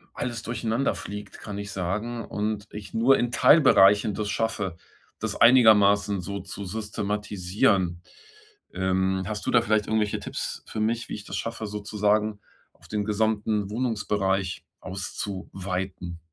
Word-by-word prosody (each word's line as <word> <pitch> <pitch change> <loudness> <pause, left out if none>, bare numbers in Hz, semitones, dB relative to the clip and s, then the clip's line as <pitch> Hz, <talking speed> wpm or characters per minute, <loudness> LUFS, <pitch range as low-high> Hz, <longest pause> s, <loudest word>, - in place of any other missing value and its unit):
alles 120 -3 -3
durcheinanderfliegt, 110 -3 -3
kann 105 -2 -7
ich 100 -1 -6
sagen 105 +6 -3
und 105 0 -3
ich 105 -1 -8
nur 125 +4 +4
in 120 0 0
Teilbereichen 105 -7 +6
das 105 +1 -2
schaffe, 105 -5 -1 0.4
das - - -3
einigermaßen 105 -5 +6
so 100 +3 -5
zu 100 - -7
systematisieren. 100 -3 -1 0.7
Ähm, 95 0 0
hast 105 -1 -4
du - - 0
da 120 - +5
vielleicht 110 -3 +1
irgendwelche 110 -2 0
Tipps - - -5
für 110 - -6
mich, 115 +2 0
wie - - -5
ich 105 - -9
das - - -6
schaffe, 115 -1 -4
sozusagen 105 0 0 0.3
auf - - -19
den 105 -1 -2
gesamten 105 -1 0
Wohnungsbereich 105 -5 -1
auszuweiten? 95 -2 -5
105 Hz, 130 wpm, -26 LUFS, 95-110 Hz, 0.7 s, Teilbereichen